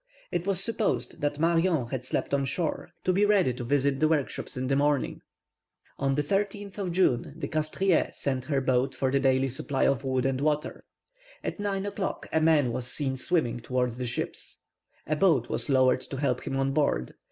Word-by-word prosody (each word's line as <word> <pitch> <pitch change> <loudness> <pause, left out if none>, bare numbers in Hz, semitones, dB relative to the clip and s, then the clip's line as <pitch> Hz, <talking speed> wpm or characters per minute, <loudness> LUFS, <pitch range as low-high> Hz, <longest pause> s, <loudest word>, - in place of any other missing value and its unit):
It 175 +2 -2
was 195 -3 +2
supposed 225 +1 -1
that 145 0 0
Marion 165 -3 +2
had 130 -1 -3
slept 130 - -2
on 140 -1 +2
shore, 155 +5 -2
to 185 - +2
be 200 +3 +3
ready 200 -10 +3
to 125 - -6
visit 140 +2 +1
the 155 - +4
workshops 150 -4 -1
in 130 - -2
the 135 +1 +1
morning. 145 0 +1 0.8
On 135 0 +1
the 150 - +1
13th 200 +4 -2
of 185 -3 -2
June 155 -6 +1
the 165 - -3
Castries 155 +4 +1
sent 130 -2 -1
her 140 -2 0
boat 130 0 +1
for 130 -1 0
the 140 - +3
daily 135 0 +3
supply 135 +2 -2
of 140 0 +1
wood 130 -1 0
and 135 0 0
water. 150 0 -1 0.6
At - - -4
nine 200 -1 -1
o'clock 200 -1 -3
a 160 - +3
man 155 -6 +4
was 120 +1 -3
seen 135 0 -2
swimming 130 -4 0
towards 125 0 -1
the 125 - -2
ships. 120 - -5 0.4
A 155 - 0
boat 150 -8 +3
was - - -2
lowered 130 -2 +4
to 135 - -7
help 130 -3 -1
him 135 - -1
on 135 0 +1
board. 140 - 0
140 Hz, 195 wpm, -28 LUFS, 130-170 Hz, 0.8 s, the